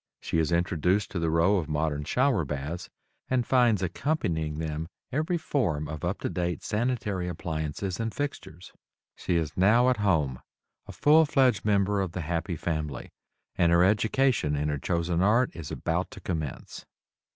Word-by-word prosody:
She 85 - -1
is 80 +1 +1
introduced 90 +3 +1
to 90 - -2
the 80 -1 0
row 85 +5 +3
of 80 -4 -3
modern 75 -1 -1
shower 125 - +2
baths, 75 +4 -5 0.4
and 125 -2 +1
finds 120 -7 +3
accompanying 85 - -1
them 80 0 -3 0.2
every 155 +6 0
form 105 - -1
of 75 -1 -7
up - - -2
to - - -1
date 90 -2 -2
sanitary 105 -5 -1
appliances 80 +2 -4
and 115 0 -1
fixtures. 105 - -6 0.4
She 90 - -2
is 80 -3 -1
now 115 +7 +4
"at 125 - 0
home," 80 -11 +1 0.5
a - - -7
full 155 +1 +5
fledged 130 -8 +2
member 100 -1 +2
of 95 -3 -3
the 90 - -3
"happy 85 +2 -2
family," 75 -5 -4 0.4
and 85 -1 +3
her 85 +1 +5
education 110 - +2
in 75 +1 -1
her 75 -1 -2
chosen 85 +2 0
art 115 +6 +3
is 80 -4 -7
about - - -2
to - - -11
commence. 80 -6 -5
90 Hz, 165 wpm, -27 LUFS, 80-110 Hz, 0.5 s, full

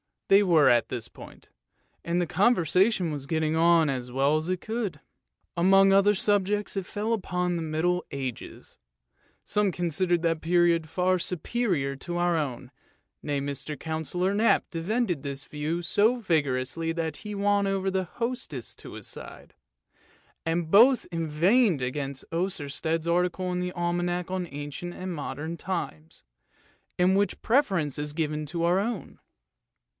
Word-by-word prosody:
They 195 +1 +7
were 160 -7 +5
at 120 -1 +3
this 115 - -5
point, - - -14 0.5
and 170 +1 0
the - - +1
conversation 185 -1 +2
was 140 -2 -5
getting 160 0 0
on 165 -1 +4
as 125 -2 -3
well 140 +3 +3
as 155 +1 -3
it 185 -1 -2
could. 215 -9 -3 0.6
Among 195 +2 +5
other 200 +1 +5
subjects, 205 +1 0
it 195 - -2
fell 215 +3 -2
upon 180 -4 -1
the 170 - -2
Middle 165 +3 0
Ages; 135 -4 -6 0.7
some 210 -2 +1
considered 175 +1 0
that 165 -1 +1
period 170 -1 +2
far 180 +3 +1
superior 175 - -1
to 175 +5 -5
our 175 0 +2
own, 130 -4 -4 0.5
nay, 145 -1 -2
Mr. 140 +1 -4
Councillor 165 +4 -2
Knap 220 +3 +3
defended 180 - -1
this 140 -1 -5
view 155 +3 -3
so 205 +7 +3
vigorously 160 - 0
that 160 -2 -3
he 210 -1 -7
won 200 0 +2
over 195 0 0
the 190 0 0
hostess 230 - -4
to - - -11
his - - -8
side, - - -10 0.9
and 165 0 -1
both 245 +6 +6
inveighed 165 - +2
against 135 +1 -4
Oersted's 165 -2 -2
article 180 +1 0
in 180 - -1
the 180 0 -3
Almanack 175 0 -1
on 185 -2 -2
Ancient 145 +5 -6
and 185 0 -5
Modern 155 +2 -5
Times, 80 - -5 0.7
in 180 +1 +4
which 200 -1 +2
the - - -20
preference 190 - +1
is 150 0 -3
given 155 -1 -2
to 170 +2 -3
our 175 +2 +3
own. 215 -1 -4
175 Hz, 150 wpm, -27 LUFS, 155-190 Hz, 0.9 s, They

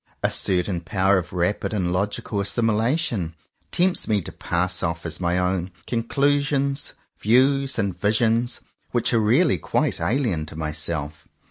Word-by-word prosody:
A - - +2
certain 90 -1 +1
power 95 +1 +2
of 90 - -8
rapid 90 +5 -1
and 90 -3 0
logical 100 +2 -2
assimu 115 +3 +1
lation 115 - 0 0.4
tempts 180 +1 +2
me 105 -2 +2
to - - -7
pass 90 +1 -1
off 85 +1 -2
as 85 - -3
my 85 0 +1
own 90 0 0 0.2
con 115 -2 0
clusions 140 +2 0 0.3
views 135 +4 +3
and 100 -5 -1
visions 115 +3 +1 0.3
which - - +1
are 115 - +4
really 110 - +3
quite - - 0
alien 110 - 0
to 75 - -8
myself. 80 -1 -4
100 Hz, 150 wpm, -23 LUFS, 90-125 Hz, 0.4 s, are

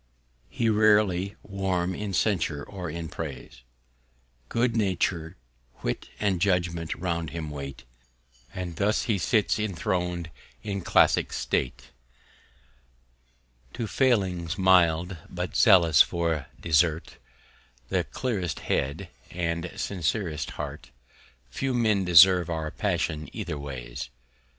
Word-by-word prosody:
He's 115 -1 +1
rarely 105 -3 +3
warm 95 -2 -1
in 105 +2 -4
Censure 85 -9 0
or 90 -1 -6
in 85 +1 -5
Praise: 75 -7 -7 0.9
Good 120 0 +1
Nature, 95 -6 -1 0.5
Wit, - - -3
and 95 -4 0
Judgment 85 -4 0
round 85 -3 -2
him 80 -3 -5
wait; 70 -2 -7 0.7
And 90 -3 -6
thus 105 +4 +1
he 105 -5 0
sits 100 +6 +1
inthron'd 90 -3 -2 0.3
in 100 -2 -3
Classick - - +3
State: 65 +1 -2 1.8
To 120 - -3
Failings 95 - +1
mild, 90 -1 +3
but 90 0 -5
zealous 85 -8 +6
for 85 -5 0
Desert; 80 -1 +1 0.7
The - - +1
clearest 95 -11 -3
Head, 70 +8 -1 0.2
and 85 -1 -2
the 90 - -9
sincerest 85 -4 -2
Heart. - - -6 0.6
Few 135 - -2
Men 110 -5 +2
deserve 90 0 +7
our 80 -2 -3
Passion 85 -6 -2
either 85 -9 -4
Ways. 60 -4 -6
90 Hz, 110 wpm, -27 LUFS, 80-100 Hz, 1.8 s, deserve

